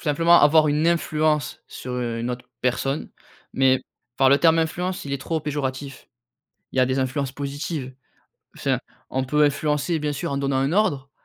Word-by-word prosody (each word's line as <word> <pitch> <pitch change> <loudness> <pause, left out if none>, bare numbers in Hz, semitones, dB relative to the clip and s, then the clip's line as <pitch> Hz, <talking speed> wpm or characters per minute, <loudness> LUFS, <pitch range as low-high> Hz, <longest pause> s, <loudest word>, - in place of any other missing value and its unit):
simplement 165 +2 +4
avoir 155 +1 +5
une 150 +3 +2
influence 155 -3 0
sur 125 0 -5
une 115 0 -3
autre 125 0 -6
personne, 135 +3 -1 0.4
mais 130 -1 +3 0.3
par 135 -1 +5
le 140 - +5
terme 165 0 +4
influence, 180 +3 -2
il 140 - -5
est 140 - -1
trop 160 +4 -2
péjoratif. 140 -2 -4 0.7
Il - - -4
y - - +5
a - - +5
des 130 +1 0
influences 130 +1 -1
positives. 140 -1 -5 0.6
Enfin, - - 0 0.3
on 130 0 -1
peut 150 +3 +2
influencer 150 +2 0
bien 150 -1 -2
sûr 140 - -4
en 140 - -1
donnant 135 -1 0
un 135 +4 +1
ordre, 145 -10 +1
140 Hz, 175 wpm, -23 LUFS, 130-155 Hz, 0.7 s, avoir